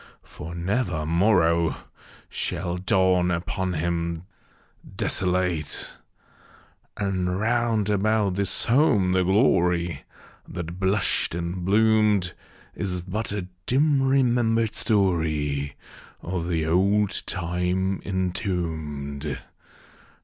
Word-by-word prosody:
for 85 +2 -9
never 90 -3 -1
morrow 85 -1 +3 0.5
Shall 90 0 -2
dawn 95 -2 +2
upon 90 +2 -2
him 85 0 -2 0.7
desolate 90 -4 -1 0.5
!) - - -30
And 95 -2 -1
round 115 -1 +1
about 105 -1 +1
his 100 -1 +1
home 115 -7 +3
the 95 0 +3
glory 90 - +2 0.4
That 85 0 -6
blushed 95 -3 +1
and 85 +1 -3
bloomed, 105 -2 +3 0.4
Is 90 -2 -3
but 95 +5 -3
a 105 -2 -2 0.2
dim 140 +2 +3
remembered 120 -4 +2
story 80 - 0 0.5
Of 85 -1 -3
the 80 -3 0
old 100 +5 +2
time 90 +1 -1
entombed. 80 -7 -3
90 Hz, 90 wpm, -25 LUFS, 85-105 Hz, 0.7 s, morrow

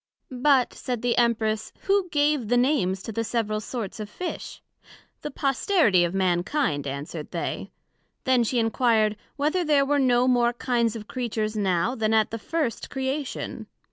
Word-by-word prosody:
But, 260 0 +3
said 245 -3 -4
the 245 -1 +2
Empress, 220 -2 +1
who 395 -2 +1
gave 290 -5 +1
the 245 +2 +2
Names 240 -8 +1
to - - -5
the 230 +2 -2
several 220 -2 -1
sorts 220 -1 -5
of 210 -1 -5
Fish? 360 +11 -6 0.6
The 295 - -4
posterity 275 - +2
of 175 +2 -1
Mankind, 180 - 0
answered 145 +3 -5
they. - - -4 0.5
Then 260 -3 +3
she 245 +2 -1
enquired, 225 -2 +2 0.2
Whether 310 +5 +1
there 295 -3 +3
were 290 +1 +2
no 250 -2 +3
more 240 -1 +3
kinds 235 -2 0
of 210 -2 -7
Creatures 225 -4 -2
now, 195 +2 +1
then 220 -3 +1
at 220 -1 +2
the 225 - -4
first 295 -1 -2
Creation? 270 +1 -4
240 Hz, 160 wpm, -25 LUFS, 215-270 Hz, 0.6 s, But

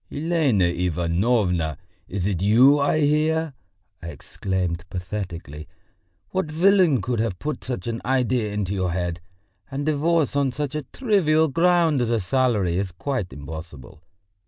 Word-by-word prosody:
"Elena 150 - +1
Ivanovna! 85 - 0 0.3
is 95 -1 -3
it 95 -4 -1
you 125 +8 +5
I 145 +2 +2
hear!" 155 +1 +1 0.5
I 85 - -7
exclaimed 90 0 -3
pathetically. 90 -5 -6 0.6
"What 185 -4 -1
villain 170 - +3
could 120 -2 -1
have 110 -5 -1
put 150 +7 -4
such 125 -1 -4
an 115 -1 -3
idea 125 -4 0
into 100 -2 -2
your 95 -2 -1
head? 90 -1 -3 0.5
And 140 +1 -4
divorce 155 0 +1
on 140 -3 +1
such 145 0 -3
a 150 - -2
trivial 160 - +1
ground 165 -2 +3
as 120 - 0
a 115 -1 +1
salary 105 -5 +1
is 100 -2 -3
quite 105 +1 -3
impossible. 75 0 -10
115 Hz, 140 wpm, -23 LUFS, 90-150 Hz, 0.6 s, you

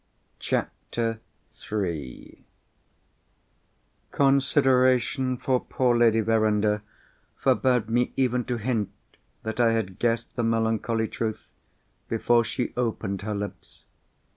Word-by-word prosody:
CHAPTER 115 -1 -2 0.5
III 85 -11 -4 1.7
Consideration 130 -2 +3
for 130 +1 +1
poor 125 -1 +1
Lady 115 -1 +4
Verinder 105 -1 +2 0.6
forbade 125 -4 +2
me 120 +2 +1
even 125 -2 +1
to 125 - -2
hint 115 -2 -1 0.5
that 110 +2 -4
I 115 -1 +4
had 95 -5 -2
guessed 115 -1 -1
the 120 - -1
melancholy 115 0 0
truth, 110 -1 -4 0.6
before 115 +1 +3
she 120 +1 -3
opened 110 -5 -2
her 105 0 -3
lips. 100 -2 -7
115 Hz, 100 wpm, -26 LUFS, 110-125 Hz, 1.7 s, Lady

